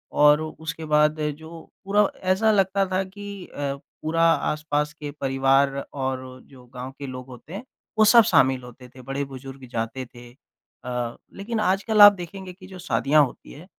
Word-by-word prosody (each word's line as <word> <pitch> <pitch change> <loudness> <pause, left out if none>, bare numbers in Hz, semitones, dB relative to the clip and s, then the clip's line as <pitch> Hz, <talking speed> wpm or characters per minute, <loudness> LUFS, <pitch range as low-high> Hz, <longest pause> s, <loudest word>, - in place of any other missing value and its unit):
और 150 +1 +5
उसके 160 0 -6
बाद 150 0 +2 0.2
जो 160 +1 -10 0.2
पूरा 205 +1 +3 0.2
ऐसा 220 +4 +3
लगता 195 -1 +2
था 185 +1 +1
कि 200 0 -9
अ, 140 -1 -4 0.3
पूरा 165 +2 0
आस-पास 150 -2 +1
के 150 -1 -7
परिवार 135 +1 +2 0.2
और 130 -1 -4
जो 130 -2 -17
गाँव 125 +1 -7
के 140 - -6
लोग 130 0 -8
होते 130 +5 -12
हैं, 200 +5 -6 0.3
वो 215 - +6
सब 235 +2 +7
शामिल 130 -8 +3
होते 125 +1 -13
थे, 130 +1 -14
बड़े 135 +2 -3
बुजुर्ग 135 0 -10
जाते 115 +3 -3
थे। 120 0 -14
अ, 125 -2 -8 0.2
लेकिन 220 +3 -4
आजकल 210 +2 +2
आप 205 0 +11
देखेंगे 185 0 -8
कि 185 +1 -15
जो 185 -1 -11
शादियाँ 140 0 +3
होती 125 - -12
है 150 +5 -12
150 Hz, 175 wpm, -24 LUFS, 130-185 Hz, 0.3 s, आप